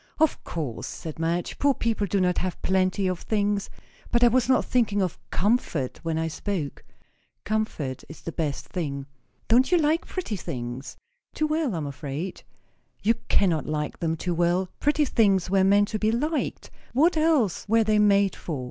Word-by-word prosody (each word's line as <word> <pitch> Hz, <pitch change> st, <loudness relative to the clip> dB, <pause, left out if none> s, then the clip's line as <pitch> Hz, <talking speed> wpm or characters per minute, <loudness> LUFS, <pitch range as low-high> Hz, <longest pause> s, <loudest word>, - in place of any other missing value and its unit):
"Of 315 Hz, -1 st, +2 dB
course," 145 Hz, -9 st, -4 dB
said 160 Hz, -1 st, -7 dB
Madge, 170 Hz, +2 st, -1 dB
"poor 280 Hz, -2 st, +3 dB
people 225 Hz, -3 st, 0 dB
do 200 Hz, +2 st, +1 dB
not 180 Hz, -1 st, +2 dB
have 185 Hz, -1 st, -3 dB
plenty 190 Hz, +1 st, +1 dB
of 185 Hz, -2 st, 0 dB
things. 205 Hz, -1 st, 0 dB, 0.4 s
But 240 Hz, 0 st, +3 dB
I 240 Hz, -, +8 dB
was 250 Hz, +1 st, +2 dB
not 255 Hz, -, +4 dB
thinking 220 Hz, -5 st, +1 dB
of 185 Hz, -4 st, -1 dB
comfort, 180 Hz, -, 0 dB
when 165 Hz, -1 st, -2 dB
I 160 Hz, 0 st, 0 dB
spoke." 160 Hz, -3 st, -4 dB, 0.6 s
"Comfort 205 Hz, -11 st, -2 dB
is 155 Hz, -, -11 dB
the 165 Hz, -, -5 dB
best 155 Hz, -4 st, -2 dB
thing." 140 Hz, -6 st, -4 dB, 0.4 s
"Don't 250 Hz, +6 st, +4 dB
you 355 Hz, -, +6 dB
like 315 Hz, +1 st, +1 dB
pretty 350 Hz, -, -3 dB
things?" 130 Hz, -5 st, -6 dB, 0.4 s
"Too 310 Hz, -, +1 dB
well, 305 Hz, -, 0 dB
I -, -, -2 dB
am 155 Hz, -, -3 dB
afraid." 145 Hz, +5 st, -5 dB, 0.6 s
"You 225 Hz, -, +4 dB
cannot 175 Hz, -6 st, +2 dB
like 150 Hz, -1 st, -3 dB
them 165 Hz, -1 st, -1 dB
too 175 Hz, +2 st, -2 dB
well. 175 Hz, +2 st, +1 dB
Pretty 295 Hz, +1 st, +2 dB
things 195 Hz, -8 st, +2 dB
were 195 Hz, -1 st, +4 dB
meant 205 Hz, +1 st, +4 dB
to 215 Hz, -, -2 dB
be 215 Hz, +1 st, +2 dB
liked. 300 Hz, +7 st, -2 dB, 0.2 s
What 315 Hz, +8 st, +4 dB
else 310 Hz, -, +2 dB
were 225 Hz, +1 st, +5 dB
they 215 Hz, 0 st, +2 dB
made 200 Hz, -2 st, +4 dB
for? 155 Hz, -6 st, -5 dB
195 Hz, 180 wpm, -26 LUFS, 165-230 Hz, 0.6 s, I